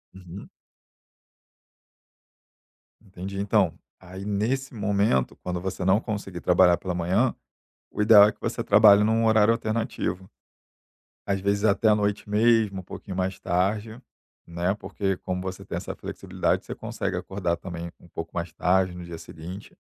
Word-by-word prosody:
Uhum. 95 +1 -10 2.6
Entendi. 95 +1 -7
Então, 100 0 +2 0.3
aí 95 +2 -10
nesse 120 +7 -1
momento, 100 - +1
quando 90 -1 -3
você 95 +1 -4
não 95 +3 +4
conseguir 100 -6 -5
trabalhar 90 -1 +5
pela 90 -2 -4
manhã, 95 +9 +1 0.6
o - - -3
ideal 105 -1 +8
é 105 - 0
que - - -22
você - - -2
trabalhe 105 0 +7
num 110 +1 +2
horário 110 0 +5
alternativo. 110 -4 -3 1.0
Às 100 -1 0
vezes 100 +1 0
até 110 +1 +3
à 105 - +6
noite 105 0 -1
mesmo, 105 -2 +3
um - - -10
pouquinho 95 +1 -8
mais 95 0 -2
tarde, 105 +5 -1 0.5
né. 85 +3 -1
Porque, 100 -2 -3
como 90 0 -4
você 95 0 -6
tem - - -5
essa - - -5
flexibilidade, - - -2
você - - -6
consegue - - -4
acordar 90 -3 -2
também 85 -1 -7
um - - -18
pouco 80 0 -7
mais 85 -1 -4
tarde 95 +1 +1
no 90 0 -8
dia 85 -1 -8
seguinte. 85 +4 -10
95 Hz, 150 wpm, -25 LUFS, 90-105 Hz, 2.6 s, ideal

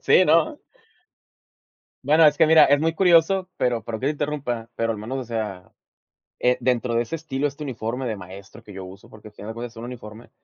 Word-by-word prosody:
Sí, 185 - +5
¿no? 170 - +2 1.5
Bueno, 155 +3 +5
es 150 - +2
que, 160 - +5
mira, 160 -1 +7
es 145 +1 +3
muy 165 +1 0
curioso, 180 +1 +3
pero 120 -2 0
perdón 110 0 -6
que - - -2
te - - +2
interrumpa, 140 -6 -4
pero 115 0 0
al 110 - -5
menos, 125 +5 -5
o 130 - -4
sea, 110 -6 -5 0.7
eh, 125 0 +3
dentro 125 -2 0
de 120 - +2
ese 165 +7 -5
estilo, 145 -3 -3
este 145 +1 -6
uniforme 125 -1 -4
de 110 -3 -2
maestro 95 +4 -12
que 105 - -12
yo 95 -1 -8
uso, 95 +2 -14
porque 110 0 -13
al 105 - -21
final 105 +1 -8
de 110 - -7
cuentas 120 0 -7
es - - -28
un 115 - -8
uniforme, 115 -2 -10
125 Hz, 225 wpm, -23 LUFS, 110-150 Hz, 1.5 s, mira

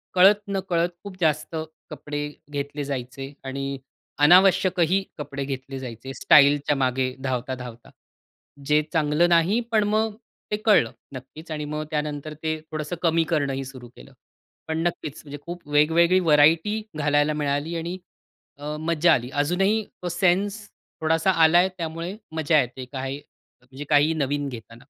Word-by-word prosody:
कळत-नकळत 190 -2 +3
खूप 200 -2 -9
जास्त 155 0 0 0.3
कपडे 145 0 -5 0.2
घेतले 145 0 -4
जायचे 135 0 -5
आणि 135 +1 -4 0.5
अनावश्यकही 185 +1 +5
कपडे 140 -2 -5
घेतले 135 0 -5
जायचे 125 +1 -8
स्टाईलच्या 145 +1 +5
मागे 130 -1 0
धावता-धावता. 125 -2 -4 0.8
जे 150 +1 +3
चांगलं 160 +1 +2
नाही 175 +6 +3
पण 215 -2 +3
मग 215 0 0 0.4
ते 210 - +1
कळलं 200 - +4 0.2
नक्कीच 140 +5 -10
आणि 150 -1 -3
मग 150 +1 -4
त्यानंतर 150 0 -3
ते 155 0 -1
थोडंसं 155 +2 -4
कमी 165 -1 +3
करणंही 140 -4 0
सुरू 130 -2 -10
केलं. 135 - -15 0.5
पण 160 - -2
नक्कीच. 155 -4 -5
म्हणजे 145 -1 -8
खूप 175 -2 -8
वेगवेगळी 165 +5 +4
व्हरायटी 165 +6 +4 0.2
घालायला 145 0 +2
मिळाली 150 +2 -2
आणि 170 +3 -4 0.6
अ, 150 +1 -5
मज्जा 165 +1 +3
आली. 125 -3 -1
अजूनही 190 +9 +1 0.2
तो 175 - -2
सेन्स 190 +4 +1 0.4
थोडासा 160 +3 +2
आलाय 175 +4 +5
त्यामुळे 165 +2 -4 0.2
मज्जा 155 0 +3
येते 125 +1 -6
काय 135 0 -3 0.5
म्हणजे 130 +3 -10
काही 150 +2 +4
नवीन 145 -1 -1
घेताना. 115 -1 -11
150 Hz, 135 wpm, -24 LUFS, 140-170 Hz, 0.8 s, अनावश्यकही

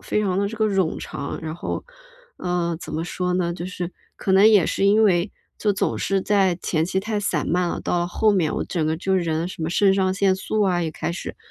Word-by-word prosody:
非 210 - 0
常 190 -2 0
地 200 0 +1
这 225 - -7
个 220 - +1
冗 190 -5 0
长， 140 0 -5
然 160 0 -4
后 175 - -4 1.0
怎 - - -8
么 160 +2 -2
说 180 0 -2
呢？ 175 -1 0
就 175 +1 -5
是 180 -1 -5 0.2
可 190 - -1
能 195 +2 +7
也 205 -6 +5
是 195 - +1
因 215 +2 +5
为 180 -1 +2 0.3
就 210 - +1
总 195 - 0
是 195 -1 0
在 195 -4 +2
前 155 -2 0
期 185 +2 -1
太 210 +1 -2
散 205 - -1
漫 175 0 +1
了， - - -3
到 175 0 0
后 215 +4 +2
面 175 -6 +1
我 - - -2
整 170 -4 -2
个 160 - 0
就 190 +3 0
人 165 -2 0
什 175 -3 -7
么 160 - -1
肾 195 +2 +3
上 190 -1 +1
腺 195 -1 +3
素 210 +3 -1
啊 180 -3 +2
也 160 - -2
开 165 - -3
始， 180 - -6
185 Hz, 255 characters per minute, -23 LUFS, 170-200 Hz, 1.0 s, 能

